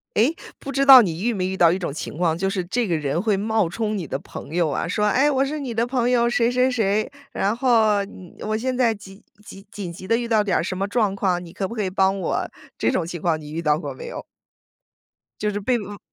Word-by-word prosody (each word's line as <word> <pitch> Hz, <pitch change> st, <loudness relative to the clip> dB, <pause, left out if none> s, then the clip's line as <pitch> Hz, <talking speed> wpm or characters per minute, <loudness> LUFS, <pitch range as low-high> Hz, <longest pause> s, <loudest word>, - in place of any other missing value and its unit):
诶， 250 Hz, +10 st, +3 dB, 0.2 s
不 275 Hz, -, -6 dB
知 275 Hz, 0 st, +1 dB
道 265 Hz, -2 st, +11 dB
你 175 Hz, -4 st, -2 dB
遇 240 Hz, +1 st, +1 dB
没 185 Hz, -3 st, -1 dB
遇 190 Hz, 0 st, -3 dB
到 170 Hz, -3 st, +6 dB
一 185 Hz, -, -1 dB
种 175 Hz, -, -3 dB
情 145 Hz, -, -6 dB
况， 165 Hz, -2 st, +1 dB
就 195 Hz, +3 st, -1 dB
是 195 Hz, -1 st, -1 dB
这 235 Hz, +5 st, -1 dB
个 170 Hz, -, +1 dB
人 150 Hz, 0 st, -1 dB
会 210 Hz, +2 st, +1 dB
冒 215 Hz, 0 st, +1 dB
充 215 Hz, +4 st, -2 dB
你 180 Hz, -, -4 dB
的 135 Hz, -, -3 dB
朋 -, -, -10 dB
友 170 Hz, -2 st, +2 dB
啊， 145 Hz, -, -2 dB
说： 210 Hz, +4 st, +1 dB
“诶， 270 Hz, +6 st, +3 dB
我 270 Hz, -2 st, +2 dB
是 295 Hz, +3 st, -3 dB
你 265 Hz, -5 st, -4 dB
的 230 Hz, +1 st, 0 dB
朋 245 Hz, -1 st, 0 dB
友 235 Hz, -1 st, +3 dB
谁 240 Hz, 0 st, +2 dB
谁 250 Hz, +1 st, +3 dB
谁， 215 Hz, -4 st, 0 dB, 0.2 s
然 200 Hz, +3 st, 0 dB
后， 220 Hz, -5 st, +3 dB
嗯， 185 Hz, -3 st, -13 dB
我 215 Hz, 0 st, -2 dB
现 255 Hz, +3 st, -1 dB
在 240 Hz, -3 st, +3 dB
急 200 Hz, -1 st, -13 dB, 0.2 s
急 195 Hz, -1 st, -12 dB
紧 190 Hz, -4 st, -6 dB
急 185 Hz, +2 st, -10 dB
地 230 Hz, -, +3 dB
遇 235 Hz, 0 st, -2 dB
到 220 Hz, -2 st, +3 dB
点 205 Hz, -, +1 dB
儿 -, -, 0 dB
什 185 Hz, +1 st, -3 dB
么 195 Hz, +1 st, -1 dB
状 205 Hz, -2 st, +1 dB
况， 185 Hz, -3 st, 0 dB
你 170 Hz, -, -11 dB
可 190 Hz, +1 st, -3 dB
不 230 Hz, -, -7 dB
可 220 Hz, -3 st, -2 dB
以 190 Hz, -, -1 dB
帮 190 Hz, +1 st, +1 dB
我？” -, -, -1 dB, 0.3 s
这 -, -, +1 dB
种 165 Hz, -, -1 dB
情 175 Hz, 0 st, -5 dB
况 160 Hz, -1 st, 0 dB
你 150 Hz, 0 st, -10 dB
遇 160 Hz, -, -3 dB
到 150 Hz, -2 st, +1 dB
过 -, -, -5 dB
没 485 Hz, -, -9 dB
有？ -, -, -6 dB, 1.2 s
就 210 Hz, -, 0 dB
是 205 Hz, -, -3 dB
被 245 Hz, +5 st, +1 dB
嗯。 205 Hz, -2 st, -7 dB
205 Hz, 285 characters per minute, -23 LUFS, 180-235 Hz, 1.2 s, 道